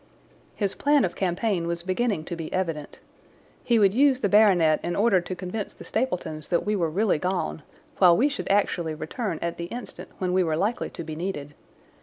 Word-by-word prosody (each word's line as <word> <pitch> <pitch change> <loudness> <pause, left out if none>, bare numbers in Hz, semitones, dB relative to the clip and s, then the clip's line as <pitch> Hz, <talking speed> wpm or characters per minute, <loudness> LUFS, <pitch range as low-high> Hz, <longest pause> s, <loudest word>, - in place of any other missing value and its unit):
His 200 -3 -1
plan 290 -3 +3
of 175 - -4
campaign 185 -1 -1
was 170 0 -2
beginning 190 -1 0
to 170 - -5
be 165 -2 -6
evident. 165 -6 -3 0.7
He 235 - +3
would 200 -3 +4
use 265 +1 +4
the 205 - +1
baronet 185 -7 +5
in 175 - -3
order 200 -3 +3
to 185 +1 -5
convince 190 +3 -5
the - - -11
Stapletons 180 - -3
that 170 - +1
we 210 +1 +1
were 170 -5 0
really 195 0 +1
gone, 180 - -2 0.4
while 175 -2 +7
we 270 - +4
should 285 - -4
actually 175 -5 +1
return 190 +3 -4
at 170 0 -3
the 170 - -4
instant 240 +7 -8
when 180 -1 -1
we 185 0 +3
were 160 -2 0
likely 210 +7 -1
to - - -7
be 155 -1 -6
needed. 155 -4 -4
185 Hz, 200 wpm, -25 LUFS, 170-210 Hz, 0.7 s, while